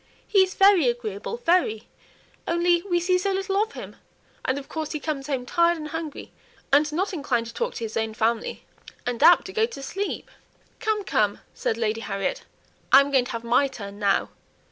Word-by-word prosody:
"He 400 - +3
is 375 -1 +3
very 390 -7 +6
agreeable, 235 - -3
very; 335 - +1 0.6
only 345 0 +2
we 350 -2 0
see 365 +1 +2
so 390 +2 0
little 390 +1 0
of 440 +1 -2
him; - - -9 0.5
and 260 - 0
of 280 - -7
course 315 -1 -4
he 305 - -2
comes 290 -3 -4
home 265 -4 -2
tired 340 +4 +2
and 305 -1 -6
hungry, 320 -1 -6 0.4
and 295 +1 +4
not 375 +6 -1
inclined 265 -8 -1
to 230 - -9
talk 480 +1 -2
to - - -5
his 220 -1 -5
own 220 -1 -2
family, 225 +1 -1 0.4
and 245 0 -3
apt 335 +3 +7
to 380 - -8
go 445 0 +2
to 370 - -9
sleep." 390 +9 -4 0.5
"Come, 435 -2 0
come!" 210 - 0
said 225 - -2
Lady 225 0 -1
Harriet, 195 -3 -3 0.5
"I'm 275 +2 +7
going 260 -3 +3
to 255 - -6
have 230 0 -4
my 240 +4 +3
turn 205 -6 -9
now. 200 -2 +1
295 Hz, 195 wpm, -25 LUFS, 235-365 Hz, 0.6 s, apt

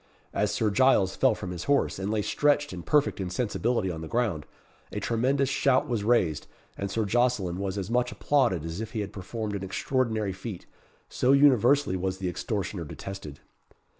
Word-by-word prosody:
As - - +1
Sir 110 -2 0
Giles 120 -5 +3
fell - - +3
from 90 - -6
his 85 -1 -6
horse, 140 -7 +1
and 95 +1 -2
lay 105 -1 0
stretched 145 -1 +1
in 90 - -6
perfect 145 - +1
insensibility 105 +1 -1
on 80 -2 -6
the 80 - -6
ground, 105 - -1 0.4
a - - -3
tremendous 130 +4 +1
shout 130 -1 +2
was 115 -5 -1
raised, 100 -9 +1 0.3
and 100 - -4
Sir 110 +2 -1
Jocelyn 110 -5 +1
was 100 0 -3
as 100 +2 -4
much 125 0 +1
applauded 95 - +1
as 80 +5 -5
if 110 +1 -6
he 110 - -1
had 100 - -6
performed 105 +2 -5
an 100 - -4
extraordinary 110 0 -1
feat 95 0 -7 0.4
so 130 +2 +2
universally 140 -4 +4
was 95 +1 -2
the 95 -1 -2
extortioner 95 -1 -3
detested. 80 -2 -8
105 Hz, 180 wpm, -27 LUFS, 95-125 Hz, 0.4 s, universally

